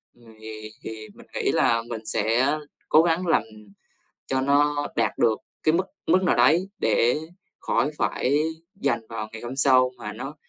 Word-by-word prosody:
ừm, 115 -2 -18
thì 110 0 -8
thì 110 -1 -7
mình - - -16
nghĩ - - 0
là 115 0 +2
mình 110 -2 -6
sẽ 125 +7 +2 0.3
cố 155 - +7
gắng 170 +2 0
làm 165 - +3 0.8
cho 130 0 0
nó 145 +1 +2
đạt - - 0
được 115 -2 +2 0.2
cái 155 - +3
mức 180 - +2 0.2
mức 185 +1 +4
nào - - +3
đấy 160 +10 +4
để 115 +2 +2 0.4
khỏi 145 - 0
phải 140 +3 +1 0.4
dành 120 - 0
vào 110 -1 -5
ngày 110 - -8
hôm 120 +2 -6
sau 130 -2 +5
mà 105 -3 -7
nó 135 +7 -7
130 Hz, 170 wpm, -24 LUFS, 110-145 Hz, 0.8 s, cố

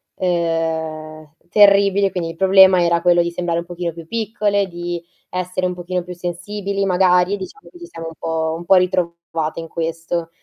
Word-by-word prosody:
ehm, 160 -3 -2 0.2
terribili, 200 0 +4
quindi 175 -3 -3
il - - -13
problema 190 0 +6
era 170 0 +2
quello 175 -1 +4
di 170 0 -2
sembrare 170 -1 -2
un - - -11
pochino 175 -1 -4
più 165 -1 -10
piccole, 210 -1 -1
di 175 -1 -5 0.3
essere 185 0 -2
un 180 - -3
pochino 180 0 -4
più 180 - -8
sensibili 195 +3 -4
magari, 180 +1 +3
diciamo 410 - -10
che 350 - -15
ci 345 - -9
siamo 165 - -8
un 165 - -13
po' 160 0 -1
un 170 - -9
po' 190 - +5
ritrovate 170 -3 -1
in 165 - -9
questo. 165 +1 -3
175 Hz, 180 wpm, -19 LUFS, 165-190 Hz, 0.3 s, problema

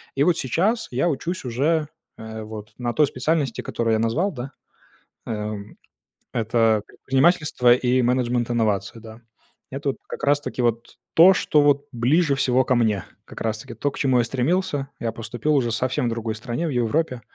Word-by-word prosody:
И 140 - +3
вот 170 0 +3
сейчас 190 - 0
я 135 +8 +1
учусь 165 +2 -3
уже, 150 +6 +1 0.3
э, 110 0 -7
вот 105 0 -9
на 120 -1 -2
той 150 -2 +4
специальности, 135 -1 -1
которую 115 -1 -1
я 110 - +2
назвал, 150 - +1
да, 130 0 -7 0.8
эм, 105 -1 -5 0.6
это 115 -2 +2
предпринимательство 135 -3 +3
и 125 0 +1
менеджмент 120 -1 +1
инновации, 110 -1 0
да, 110 +1 -12 0.5
это 140 +1 -2
вот - - -7
как - - -5
раз 145 +1 +3
таки 130 -4 -4
вот 115 0 -1 0.2
то, 185 +4 +8
что 150 -4 +2
вот 145 0 +3
ближе 140 +6 +2
всего 130 -1 +2
ко 125 - +2
мне, 105 -6 +1 0.2
как - - -11
раз 110 -1 -1
таки 120 +1 -9
то, 145 +6 -1
к - - -10
чему 130 -3 +2
я 120 - +3
стремился. 140 +2 -1
Я 115 -1 -2
поступил 120 +6 -2
уже 120 -3 +1
совсем 130 +1 0
в - - +1
другой 115 -1 -3
стране, 120 +8 -3
в - - -2
Европе, 125 +2 0
125 Hz, 180 wpm, -23 LUFS, 115-145 Hz, 0.8 s, то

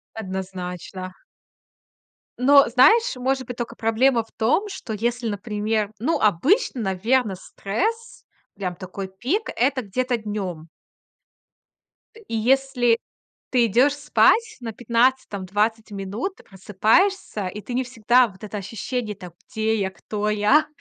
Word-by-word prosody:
Однозначно. 185 -2 -6 1.3
Но, 275 +2 +6
знаешь, 350 - +5
может 260 +1 -1
быть, 245 - -6
только 240 -1 -5
проблема 230 +2 +2
в 225 - -27
том, 250 - +1
что 385 - -7
если, 235 +2 -1
например, 210 0 -2
ну, 285 +10 0
обычно, 260 - +2
наверно, 215 +3 +1
стресс, 450 - -4 0.3
прям 185 -3 -4
такой 190 +1 -7
пик- 255 - -2
это 260 +2 +1
где-то 250 +4 -1
днем. 195 -7 -5 1.6
И - - -4
если 245 0 +2 0.5
ты 245 -2 +4
идешь 250 +7 +4
спать 440 +10 +3
на 230 -2 -4
15 240 +3 +1
там, 200 -2 -5
20 215 +3 -1
минут, 205 - -4
ты - - -17
просыпаешься 210 - +1
и 205 +3 -6
ты 245 - -7
не 255 +2 +1
всегда 245 0 +3
вот 195 -1 -16
это 210 0 -5
ощущение: 220 +2 -4
"Так, 180 -3 -11 0.2
где 220 0 0
я, 190 -1 -1
кто 210 +2 -3
я, 210 +9 +3
225 Hz, 135 wpm, -23 LUFS, 200-255 Hz, 1.6 s, Но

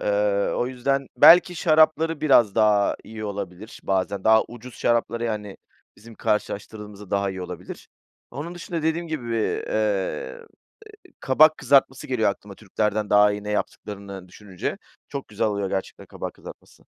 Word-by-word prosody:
Eee, - - -5 0.5
o 120 - 0
yüzden 135 +2 -1
Belki 175 +7 +7
şarapları 155 0 +3
biraz 120 -9 +4
daha 105 -2 +3
iyi 110 0 -8
olabilir 100 +1 -7
bazen. 95 0 -1
Daha 110 0 +6
ucuz 120 +1 -11
şarapları, 115 0 0
yani, 105 -3 -4 0.4
bizim 115 +1 -14
karşılaştırdığımızda 105 -1 -4
daha 100 0 0
iyi 95 -1 -6
olabilir. 90 - -9 0.4
Onun 150 +7 -6
dışında 170 -2 -5
dediğim 165 +2 -1
gibi, 150 -7 -5
eee, 110 - -1
eee, 105 - -2 0.8
kabak 155 +4 +5
kızartması 135 -1 +2
geliyor 110 -5 +1
aklıma, 100 0 -10
Türklerden 105 +1 -2
daha 105 0 +5
iyi 105 0 -6
ne 105 - -4
yaptıklarını 100 -2 -5
düşününce. 95 -1 -6 0.3
Çok 140 -1 -6
güzel 110 +2 -1
oluyor 100 -2 -1
gerçekten 95 - -5
kabak - - -7
kızartması. - - -14
110 Hz, 145 wpm, -24 LUFS, 100-135 Hz, 0.8 s, Belki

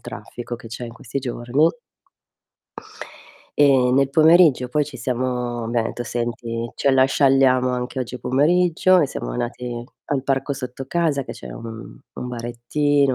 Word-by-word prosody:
traffico 120 0 -7
che 115 - -12
c'è 115 +2 -6
in 115 - -9
questi 115 +3 -5
giorni 120 0 -4 2.0
e 135 -3 +5
nel 135 0 +3
pomeriggio 160 -3 +5
poi 150 +3 +1
ci 140 -2 -9
siamo 125 -1 -2
abbian 115 0 0
etto: 120 - -5
"Senti, 120 -1 -3
ce 140 - +2
la 130 -1 +5
scialliamo 135 -2 +3
anche 125 +1 -3
oggi 125 0 -5
pomeriggio." 175 +8 +3
E 150 - +3
siamo - - -5
andati 120 - -4 0.3
al 135 -2 -1
parco 135 +1 0
sotto 130 -1 -6
casa 160 -4 +1
che - - -9
c'è 65 - -10
un 110 - -9 0.2
un 125 - -5
barettino, 125 +4 0
125 Hz, 150 wpm, -22 LUFS, 120-140 Hz, 2.0 s, e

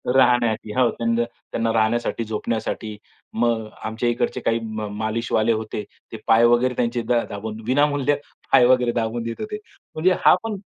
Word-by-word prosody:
राहण्याची 120 -4 +3
हो. 125 -2 +3
त्यां 115 0 -1
त्यांना 115 -1 -4
राहण्यासाठी, 115 +1 +1
झोपण्यासाठी 110 0 -3 0.4
मग 115 -1 0 0.2
आमच्या 110 +2 -1
इकडचे 120 +1 -1
काही 115 0 +1
मा 110 -1 -4
मालिशवाले 110 0 0
होते, 110 -1 -4 0.3
ते - - -6
पाय 115 +1 +6
वगैरे 120 +2 +3
त्यांचे 120 0 0
दा 120 0 +1
दाबून 110 +2 -6
विनामूल्य 145 +1 +2 0.4
पाय 120 - +7
वगैरे 125 -1 +4
दाबून 115 0 -1
देत 115 - -5
होते. 210 0 -4 0.4
म्हणजे 180 +4 +3
हा - - +8
पण 225 -1 -3
115 Hz, 160 wpm, -22 LUFS, 110-125 Hz, 0.4 s, हा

